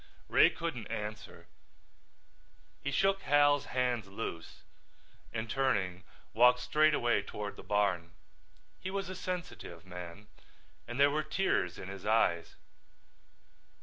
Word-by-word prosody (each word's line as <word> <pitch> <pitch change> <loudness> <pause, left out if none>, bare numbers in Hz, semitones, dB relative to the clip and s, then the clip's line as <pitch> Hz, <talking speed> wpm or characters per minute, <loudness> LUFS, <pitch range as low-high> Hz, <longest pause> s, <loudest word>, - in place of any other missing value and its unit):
Ray - - +6
couldn't - - -4
answer. 105 0 -6 1.4
He 140 - -2
shook 195 +7 +2
Hal's 145 -2 +4
hands 125 -4 0
loose 95 -4 -6 0.7
and 110 0 -3
turning 100 -9 0 0.3
walked 125 +2 +6
straight 155 +4 +3
away 120 -3 +2
toward 105 0 -6
the - - -10
barn. 95 -5 0 0.7
He 185 - -5
was 195 -1 -3
a 185 - -5
sensitive 175 - -6
man 90 +2 -9 0.6
and 120 +2 -5
there 140 0 +6
were 155 +1 +1
tears 155 - 0
in 90 - -7
his 95 -1 -8
eyes. 105 -6 +2
115 Hz, 120 wpm, -32 LUFS, 95-145 Hz, 1.4 s, Ray